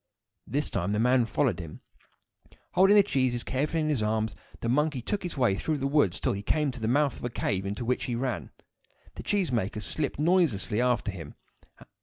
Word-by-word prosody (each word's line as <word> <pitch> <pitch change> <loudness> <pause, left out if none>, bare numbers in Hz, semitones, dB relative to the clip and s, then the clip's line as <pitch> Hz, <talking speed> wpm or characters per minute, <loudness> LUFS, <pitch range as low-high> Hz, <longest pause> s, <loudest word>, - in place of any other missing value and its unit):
This 145 +2 -1
time 100 +1 -1
the 105 - 0
man 125 +1 +4
followed 115 -4 0
him. 80 -3 -8 0.9
Holding 195 +2 +5
the 205 - +8
cheeses 130 -9 0
carefully 150 +5 -1
in 155 - 0
his 140 -7 +1
arms, 110 0 0 0.3
the - - -2
monkey 145 +3 +1
took 200 - -2
his 175 -5 -5
way 125 -7 +3
through 150 +10 -1
the 135 - -3
woods 140 - +2
till - - 0
he 100 - -4
came 150 +6 +1
to 125 - -9
the 110 - -2
mouth 140 +3 +2
of - - -13
a 120 - -1
cave, 100 -4 -2
into 105 +5 -4
which 125 +2 0
he 120 - -2
ran. 125 +1 -2 0.6
The - - -8
cheese 195 -8 0
maker 105 -3 -1
slipped 140 +8 -3
noiselessly 150 - +2
after 120 -4 +1
him. 80 -6 -9
125 Hz, 205 wpm, -28 LUFS, 110-150 Hz, 0.9 s, the